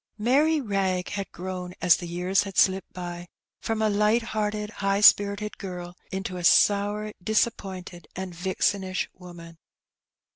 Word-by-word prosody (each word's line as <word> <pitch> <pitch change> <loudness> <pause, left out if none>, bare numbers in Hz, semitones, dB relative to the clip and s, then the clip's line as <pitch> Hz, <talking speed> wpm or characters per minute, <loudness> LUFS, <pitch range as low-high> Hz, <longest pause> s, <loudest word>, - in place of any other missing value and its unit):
Mary 285 +8 +3
Wrag 195 -6 -1
had 200 -2 -5
grown, 180 0 -6
as 180 -1 +5
the 175 - -7
years 180 +3 +1
had 195 -2 -7
slipped 190 -1 +3
by, 175 -1 -7 0.3
from 225 -1 -2
a - - +3
light 210 +3 +2
hearted, 210 -1 -2
high 195 -2 0
spirited 205 0 +4
girl, 180 -2 -7 0.2
into 190 -1 -4
a 175 - -6
sour, 205 +3 +3
dis 220 +2 +3
appointed, 185 -6 -9
and 190 -1 -5
vixenish 185 +1 -1
woman. 170 -2 -12
195 Hz, 145 wpm, -26 LUFS, 180-210 Hz, 0.3 s, as